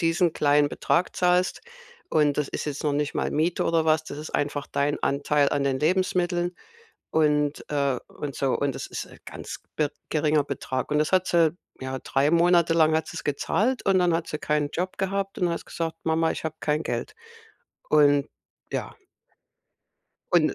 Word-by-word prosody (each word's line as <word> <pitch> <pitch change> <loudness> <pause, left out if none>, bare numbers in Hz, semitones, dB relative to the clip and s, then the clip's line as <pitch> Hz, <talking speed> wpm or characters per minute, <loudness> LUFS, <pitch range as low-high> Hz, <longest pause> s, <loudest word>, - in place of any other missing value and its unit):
diesen 165 0 +2
kleinen 145 0 +3
Betrag 170 +4 0
zahlst 180 0 +2 0.5
und 150 -2 +2
das 150 - 0
ist - - -4
jetzt 150 0 -4
noch 150 - +2
nicht 145 0 -1
mal - - -1
Miete 165 +3 +1
oder 165 -1 +2
was, 155 0 +2
das 145 - -7
ist 155 - -7
einfach 145 0 -1
dein 145 +1 -1
Anteil 145 +1 +2
an 140 -1 0
den 135 -1 +1
Lebensmitteln 175 +1 +1 0.6
und, 150 -2 +1
äh 140 -3 +1
und 145 -2 -6
so." 135 -2 +1
Und 140 -2 0
das - - -5
ist - - -6 0.2
ganz - - -8 0.2
be 150 -2 +1 0.2
geringer 150 -1 +2
Betrag. 130 -2 -3
Und 150 - +3
das 155 0 +1
hat 185 0 +3
sie 165 -1 +3 0.2
ja, 130 0 -4
3 140 +2 +1
Monate 170 0 +4
lang 160 -1 +4
hat 160 0 +1
sie's - - -7
gezahlt 215 - 0
und 195 -1 +4
dann 180 -1 +3
hat 165 0 -1
sie 150 - -3
keinen 150 -1 0
Job 180 +4 -3
gehabt 195 +1 -2
und 180 -3 +2
hat 170 - -4
gesagt: 165 -1 -4
„Mama, 160 0 +2
ich - - -5
hab 160 0 -5
kein 150 +1 0
Geld." 430 - -3 0.8
Und 145 -1 +4 0.4
ja - - -4 1.4
Und 165 -3 +4
155 Hz, 180 wpm, -25 LUFS, 145-175 Hz, 1.4 s, Monate